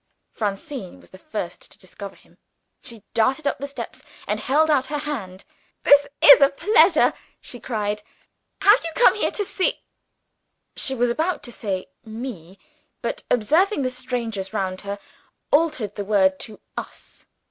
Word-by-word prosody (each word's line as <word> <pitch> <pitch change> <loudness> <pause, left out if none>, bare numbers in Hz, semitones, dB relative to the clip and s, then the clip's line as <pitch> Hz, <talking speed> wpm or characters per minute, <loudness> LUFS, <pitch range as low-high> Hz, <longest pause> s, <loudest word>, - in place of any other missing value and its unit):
Francine 205 - -4
was - - -20
the 185 - -13
first 310 - -6
to - - -15
discover - - -10
him. - - -24 0.4
She 230 -3 -6
darted 260 +7 +2
up - - 0
the 280 - -4
steps 280 - -8 0.2
and - - -1
held 310 +4 +2
out 270 -3 +2
her 295 - -2
hand. 220 -12 -5 0.4
"This 285 0 +6 0.2
is 285 - +10
a 275 - +7
pleasure!" 345 +3 +4 0.3
she 245 - -8
cried. 210 -3 -2 0.6
"Have 415 +5 +6
you 335 - -2
come - - +6
here 425 - 0
to 410 - -2
see 375 - -1 0.5
" - - -52
she 265 - 0
was 245 -1 +2
about 325 +8 -1
to 240 - -7
say 195 -5 -3 0.2
Me, 220 -6 -8 0.5
but, - - -2
observing 310 - +2
the 255 - 0
strangers 230 -6 -4
round 190 -3 -2
her, 200 0 -5 0.5
altered 295 - +2
the 205 - -4
word 190 -2 +3
to 215 -2 -8 0.2
Us. - - -9
245 Hz, 160 wpm, -23 LUFS, 205-295 Hz, 0.6 s, is